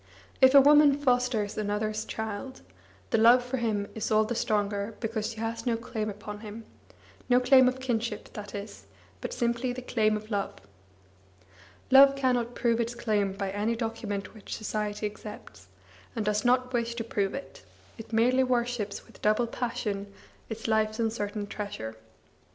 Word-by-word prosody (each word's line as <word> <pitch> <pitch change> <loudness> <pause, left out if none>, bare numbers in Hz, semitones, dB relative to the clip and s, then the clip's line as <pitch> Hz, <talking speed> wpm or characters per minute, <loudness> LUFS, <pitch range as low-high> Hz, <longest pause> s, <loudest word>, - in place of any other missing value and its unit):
If 260 +1 +7
a 280 - +11
woman 290 0 +6
fosters 250 -7 +1
another's 215 +1 -2
child, 220 +4 -5 0.5
her 225 - +3
love 240 +3 +7
for 255 +1 -2
him 215 -4 -1
is 220 - -3
all 215 0 +4
the 220 +3 -2
stronger 205 -1 -1
because 225 -2 -2
she - - -7
has 230 +2 -3
no 230 -1 +2
claim 225 -2 -4
upon 210 0 -7
him 215 +1 -9 0.6
no 245 0 +6
claim 260 0 +6
of 255 +1 0
kinship, 230 -4 -3
that 210 0 -7
is, 200 - -8 0.3
but - - -4
simply 240 0 -1
the 255 0 -7
claim 215 -3 +1
of 215 +1 -11
love. 200 -1 -2 1.4
Love 275 +1 +8
cannot 245 -3 0
prove 235 -1 +1
its 235 +1 -1
claim 210 -4 0
by 195 0 -3
any 210 +4 0
document 225 -3 -4
which 215 -3 -7
society 210 -1 -3
accepts, 210 - -8 0.5
and 220 -3 -2
does 210 0 +1
not 255 +1 +2
wish 235 -1 -1
to 235 - -3
prove 200 -2 -1
it; 275 - -9 0.4
it 225 - -10
merely 245 +4 +3
worships 240 -5 -1
with - - -18
double 215 +3 +3
passion 210 -4 -3 0.4
its 225 0 -5
life's 220 0 +1
uncertain 215 -2 -2
treasure. 200 - -6
225 Hz, 160 wpm, -28 LUFS, 210-245 Hz, 1.4 s, a